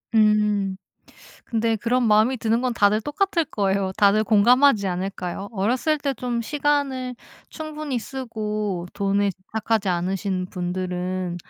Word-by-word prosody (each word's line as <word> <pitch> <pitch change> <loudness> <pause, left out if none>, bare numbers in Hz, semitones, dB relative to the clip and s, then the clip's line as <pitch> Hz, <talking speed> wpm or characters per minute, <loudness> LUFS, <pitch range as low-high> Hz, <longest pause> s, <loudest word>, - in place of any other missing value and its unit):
음 210 -3 +3 0.7
근데 225 -1 0
그런 240 +3 +1
마음이 220 +5 +4
드는 225 +1 +1
건 255 -1 0
다들 210 +1 +3
똑같을 335 - 0
거예요. 195 -7 0
다들 205 +1 +4
공감하지 225 +1 +4
않을까요? 185 +1 -4
어렸을 240 +9 +1
때 280 -1 -1
좀 240 -1 -2
시간을 280 -2 -1 0.3
충분히 305 -4 -4
쓰고 215 -7 -4
돈에 200 0 +1
집착하지 210 +2 -2
않으신 185 +1 -1
분들은 180 0 -3
215 Hz, 280 characters per minute, -23 LUFS, 195-250 Hz, 0.7 s, 마음이